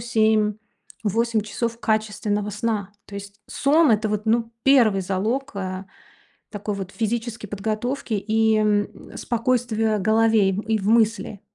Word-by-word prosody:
7-8 220 0 0
часов 230 +2 -3
качественного 210 -1 -1
сна. 210 -1 -2
То 200 - -12
есть 200 +1 -9
сон- 300 +2 +3
это 215 0 +1
вот, 210 +1 -2
ну, 230 +1 +1
первый 235 -8 +5
залог, 215 +9 -2
э, 185 0 -4 0.7
такой 205 -1 -4
вот 190 -1 -6
физической 225 -1 -3
подготовки 220 +5 -3
и, 220 +2 +2
м, 210 -1 -1
спокойствия 230 -2 0
голове 220 0 +3
и 215 +3 -1
в 200 0 -3
мысли. 225 -2 +2
215 Hz, 125 wpm, -23 LUFS, 205-230 Hz, 0.7 s, первый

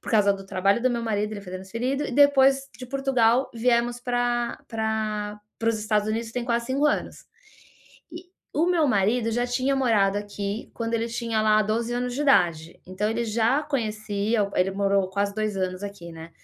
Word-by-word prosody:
por - - -7
causa 205 -3 +4
do 195 0 -8
trabalho 195 +5 +1
do 255 - +4
meu 235 -1 -2
marido, 210 -1 -1
ele 200 - -7
foi 180 -2 -10
transferido 230 +10 -3
e - - -6
depois 275 0 +5
de 255 - -8
Portugal, 260 -2 +2
viemos 240 +1 +1
pra 245 -1 -1
pra 215 -2 -2 0.2
para 230 - 0
os 225 -1 +1
Estados 210 0 0
Unidos, 225 +1 -3
tem 245 0 -3
quase 235 0 0
5 270 +3 0
anos. 295 - -2 0.9
E, 345 +2 -8 0.3
o 315 +4 +2
meu 345 -4 +3
marido 225 +2 +1
já 240 +2 0
tinha 255 +3 0
morado 205 -6 +2
aqui 205 +1 -5
quando 230 0 -3
ele 230 0 0
tinha 230 -1 -1
lá 215 0 +4
12 225 +3 -1
anos 245 0 -2
de 275 - -3
idade, 175 - +2
então 185 +3 -2
ele 235 +1 -1
já 230 +6 +1
conhecia 215 -5 -1
o 200 - -6
ele 185 +1 +2
morou 195 -1 +1
quase 200 +1 -1
2 215 -1 -2
anos 185 0 -2
aqui, 200 -4 -8
né. 165 0 -10
225 Hz, 195 wpm, -25 LUFS, 205-245 Hz, 0.9 s, depois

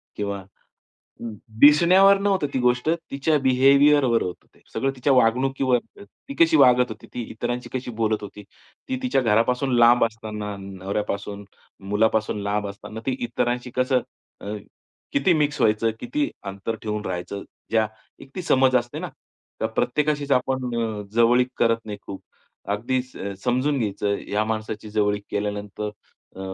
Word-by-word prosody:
किंवा 100 -1 -3
अ, 95 - -13 1.2
दिसण्यावर 180 +7 +7
नव्हतं 195 -6 +1
ती - - +2
गोष्ट. 125 +3 +1 0.2
तिच्या 145 +2 +1
बिहेवियरवर 135 -1 +4
होतं 90 - -6
ते. - - -24
सगळं 135 - 0
तिच्या 135 +2 +2
वागणुकीवर, 130 +1 +3 0.2
ती 275 - -12
कशी 335 -1 +5
वागत 125 -1 +5
होती, 110 - -9
ती 125 - -3
इतरांशी 120 +2 -4
कशी 130 -1 -4
बोलत 110 -1 +1
होती. 105 0 -9 0.5
ती 260 - -1
तिच्या 250 - +2
घरापासून 125 +3 +2
लांब 120 0 +6
असताना, 105 -2 -5
नवऱ्यापासून, 100 +1 -4 0.5
मुलापासून 110 0 +1
लांब 105 0 -1
असताना 105 +2 -9
ती 130 - +1
इतरांशी 120 +1 -2
कसं, 130 0 +2 0.4
अ, 105 +1 -5 0.6
किती 140 +6 +3
मिक्स 150 -1 0
व्हायचं, 110 +1 +3
किती 295 0 -1 0.2
अंतर 100 +3 -4
ठेवून 105 -1 -3
राहायचं? 90 +2 -4 0.3
ज्या 110 -1 +3 0.4
एक 135 - -13
ती 185 - -4
समज 130 -5 +4
असते 120 0 -2
ना, - - -4 0.5
त्या 110 - -1
प्रत्येकाशीच 145 +4 0
आपण 125 -1 0
अ, 110 -2 -3
जवळीक 120 +2 +4
करत 115 -1 +3
नाही 105 -1 -6
खूप. 95 - -7 0.5
अगदीच 130 +4 -2 0.3
समजून 130 +4 +1
घ्यायचं 105 -2 -1
या 105 +1 +1
माणसाची 110 -1 -4
जवळीक 105 -1 0
केल्यानंतर 105 +1 -3 0.5
अ, 95 - -8
120 Hz, 145 wpm, -23 LUFS, 105-135 Hz, 1.2 s, दिसण्यावर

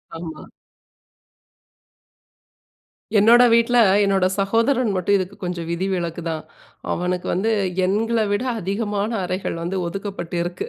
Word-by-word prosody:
ஆமா. 165 -1 -8 2.7
என்னோட 225 +4 +6
வீட்ல, 235 +1 +3 0.3
என்னோட 195 -2 +2
சகோதரன் 230 +5 +2
மட்டும், 185 +2 +2
இதுக்கு 190 +1 -4
கொஞ்சம் 175 -2 -4
விதிவிலக்கு 175 -2 -2
தான். 160 -1 -3 0.5
அவனுக்கு 180 0 -2
வந்து, 210 +5 0 0.3
எங்கள 225 +4 0
விட 205 +4 0 0.2
அதிகமான 205 +2 -2
அறைகள் 180 -2 -3
வந்து 185 +3 -2
ஒதுக்கப்பட்டிருக்கு. 175 -2 -4
195 Hz, 100 wpm, -21 LUFS, 175-210 Hz, 2.7 s, என்னோட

